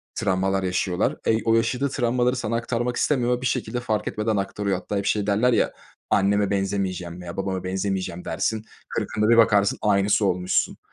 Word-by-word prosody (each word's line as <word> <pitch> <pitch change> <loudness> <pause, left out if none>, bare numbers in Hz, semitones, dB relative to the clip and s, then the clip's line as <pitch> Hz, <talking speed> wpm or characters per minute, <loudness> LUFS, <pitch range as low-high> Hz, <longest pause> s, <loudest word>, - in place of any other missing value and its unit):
travmalar 95 +1 0
yaşıyorlar. 90 +1 0
Ey 110 0 +2
o 115 - +4
yaşadığı 120 +5 +1
travmaları 125 -1 +1
sana 115 -3 -2
aktarmak 120 +1 -1
istemiyor 125 -4 +1
ve - - -12
bir - - -4
şekilde 120 0 -2
fark 110 -3 -2
etmeden 110 +1 -1
aktarıyor. 100 0 -1
Hatta 100 - -4
hep 100 - -2
şey 105 -1 0
derler 110 +5 +3
ya, - - +1 0.4
anneme 100 0 +2
benzemeyeceğim 95 -3 -2
veya 85 -1 -8
babama 95 -1 -2
benzemeyeceğim 95 -1 -3
dersin, 110 -1 -2 0.2
40'ında 105 0 -1
bir 115 - +5
bakarsın 100 -3 +4
aynısı 100 0 +2
olmuşsun. 90 -1 0
105 Hz, 170 wpm, -24 LUFS, 95-115 Hz, 0.4 s, bir